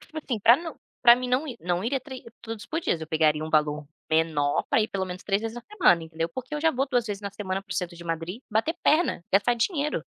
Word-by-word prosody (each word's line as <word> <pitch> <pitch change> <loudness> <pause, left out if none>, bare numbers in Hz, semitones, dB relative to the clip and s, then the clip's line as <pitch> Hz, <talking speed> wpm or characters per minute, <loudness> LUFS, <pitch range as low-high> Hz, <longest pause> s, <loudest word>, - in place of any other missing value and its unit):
tipo 315 - -16
assim, 255 -6 -3
para 230 +4 +7
não 330 +1 -8 0.2
para 235 -1 +9
mim 250 +1 -4
não 255 +5 +1
ir 255 -5 -6
não 175 +2 -1
iria 265 +3 0
trê 260 -1 -10 0.2
tudo 225 -1 -6
isso 205 - -12
por 320 - -2
dias, 170 - -1
eu 160 - -5
pegaria 155 -1 +2
um - - -5
valor 150 -1 +1 0.2
menor 155 -3 +1
para - - +3
ir 215 - -2
pelo 190 -1 -2
menos 185 0 -7
3 200 0 0
vezes 225 0 -4
na 240 - -8
semana, 330 - +3
entendeu, 165 0 -3
porque 255 - -7
eu 300 - -2
já 325 +1 +4
vou 270 +2 0
2 245 -3 +1
vezes 205 -1 -4
na 200 -1 -5
semana 190 -1 -3
para 190 -2 -7
o - - -5
centro 175 -1 -3
de 170 - -11
Madrid 165 +6 -4
bater 225 +10 +1
perna, 310 - +2
gastar 200 +5 +4
dinheiro. 295 - -1
210 Hz, 270 wpm, -26 LUFS, 170-255 Hz, 0.2 s, para